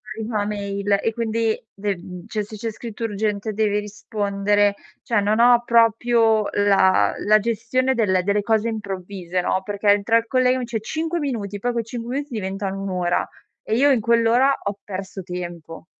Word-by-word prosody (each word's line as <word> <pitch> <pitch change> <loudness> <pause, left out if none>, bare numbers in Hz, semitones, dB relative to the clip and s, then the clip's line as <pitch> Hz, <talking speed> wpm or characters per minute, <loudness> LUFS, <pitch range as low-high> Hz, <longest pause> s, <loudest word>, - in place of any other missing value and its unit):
arriva 220 +1 -5
una 205 - 0
mail 200 -1 -1
e 225 - -1
quindi 225 -1 0 0.2
de 200 0 -2
mhmm, 180 0 -10
cioè 215 -2 -2
se 215 +1 -9
c'è 225 +1 -3
scritto 230 +1 -6
urgente 210 0 -2
devi 210 -1 +1
rispondere, 205 0 0 0.3
cioè 230 -3 +1
non 210 +2 +1
ho 240 0 +6
proprio 230 -1 +3
la 195 -2 +3
la 215 +1 +6
gestione 235 +4 0
del 190 -6 +2
delle 200 +2 +1
cose 220 +1 +1
improvvise, 195 -4 -4
no, 185 +1 0
perché 205 +1 -4
entra 205 +3 +4
il 230 0 -2
collega, 255 0 +2
mi 255 - -3
dice: 230 -2 -4
"5 320 +8 -2
minuti." 220 -9 -3
Poi 245 +4 -1
quei 235 -2 -2
5 235 +1 -6
minuti 285 -1 -4
diventano 195 -1 -3
un'ora, 180 -3 -1 0.4
e 220 - -1
io 280 +4 +4
in 250 -4 +2
quell'ora 235 +4 +3
ho 200 0 -3
perso 190 -1 -6
tempo. 175 -3 -7
210 Hz, 175 wpm, -22 LUFS, 200-230 Hz, 0.4 s, ho